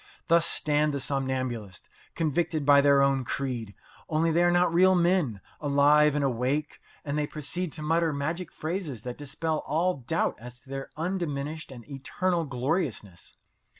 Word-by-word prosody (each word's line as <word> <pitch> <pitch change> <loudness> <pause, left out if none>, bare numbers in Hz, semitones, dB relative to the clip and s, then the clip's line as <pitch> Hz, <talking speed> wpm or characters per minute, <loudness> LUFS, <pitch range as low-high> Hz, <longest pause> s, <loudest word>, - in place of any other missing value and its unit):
Thus 170 0 +5
stand 150 -1 +1
the - - -1
somnambulists 130 -7 -3 0.3
convicted 160 -1 0
by 140 0 +7
their 140 -1 +5
own 135 -1 +2
creed 120 -5 -4 0.3
only 165 +1 +2
they 170 +2 +3
are 175 - +4
not 175 -1 +3
real 185 +2 +5
men, 170 - +1 0.2
alive 145 +1 +4
and 145 - +1
awake, 135 +4 -1 0.2
and 145 +1 -1
they 150 - 0
proceed 155 +4 -4
to 155 - -7
mutter 165 +1 +2
magic 155 +5 -3
phrases 155 - -4
that 125 +1 -6
dispel 155 +2 -2
all 170 +5 0
doubt 135 +6 -1
as 125 +1 -10
to 135 - -21
their 135 0 -5
undiminished 155 -4 -3
and 120 -4 -11
eternal 165 +5 -1
gloriousness. 125 - -3
145 Hz, 155 wpm, -27 LUFS, 135-165 Hz, 0.3 s, by